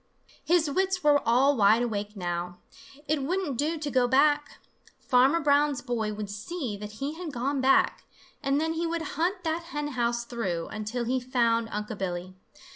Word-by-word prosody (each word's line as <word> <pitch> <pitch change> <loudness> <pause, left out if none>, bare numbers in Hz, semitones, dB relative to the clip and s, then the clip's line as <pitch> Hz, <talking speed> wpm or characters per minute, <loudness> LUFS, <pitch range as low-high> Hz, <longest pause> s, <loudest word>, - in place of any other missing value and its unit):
His 340 -2 +3
wits 375 +4 0
were 290 -1 +5
all 265 +5 +4
wide 220 +1 +4
awake 210 -2 -3
now. 175 -1 -3 0.5
It 305 -1 +1
wouldn't 335 0 -1
do 305 +6 -1
to 300 -2 -4
go 255 -1 +3
back. 290 +3 +2 0.4
Farmer 260 +5 +3
Brown's 290 -2 +2
boy 230 -4 -2
would 210 0 -5
see 235 - -4
that 210 +1 -8
he 275 +7 -4
had 330 -1 -6
gone 270 +2 -1
back, 265 +1 +3 0.4
and 275 0 +1
then 320 +1 0
he 335 +1 -1
would 330 0 -2
hunt 360 +4 -1
that 330 +1 -2
hen 295 -3 -4
house 235 -2 -1
through 190 -9 -3
until 215 +3 -3
he 255 +2 0
found 235 -3 +1
Unc' 210 0 -4
Billy. 180 -1 -4
260 Hz, 175 wpm, -27 LUFS, 220-300 Hz, 0.5 s, were